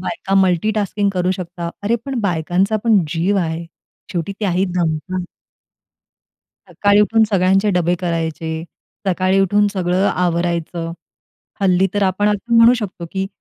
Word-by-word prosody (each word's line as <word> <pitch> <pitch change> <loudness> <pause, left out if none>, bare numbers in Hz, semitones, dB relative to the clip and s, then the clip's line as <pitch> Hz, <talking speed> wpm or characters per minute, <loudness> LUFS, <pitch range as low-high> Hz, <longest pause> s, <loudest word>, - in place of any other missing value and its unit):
बायका 195 +1 -3
मल्टीटास्किंग 200 +2 +1
करू 180 0 0
शकता. 175 -2 -5
अरे, 225 +4 +1
पण 265 -4 -2
बायकांचा 185 +2 0
पण 220 -3 +5
जीव 175 +5 0
आहे. 165 0 -3 0.5
शेवटी 175 +2 -2
त्याही 190 -2 +1
दमतात. 175 +2 -1 1.4
सकाळी 205 0 +3
उठून 220 +2 +3
सगळ्यांचे 195 +1 +3
डबे 175 0 +2
करायचे, 165 -2 -3 0.4
सकाळी 190 +1 +2
उठून 205 +2 +3
सगळं 185 0 0
आवरायचं. 170 -1 -1 0.7
हल्ली 190 0 +3
तर 205 - +1
आपण 195 +2 +1
असं 210 +3 0
म्हणू 230 +2 +7
शकतो, 200 -7 -5
की 190 0 -2
185 Hz, 130 wpm, -19 LUFS, 170-205 Hz, 1.4 s, म्हणू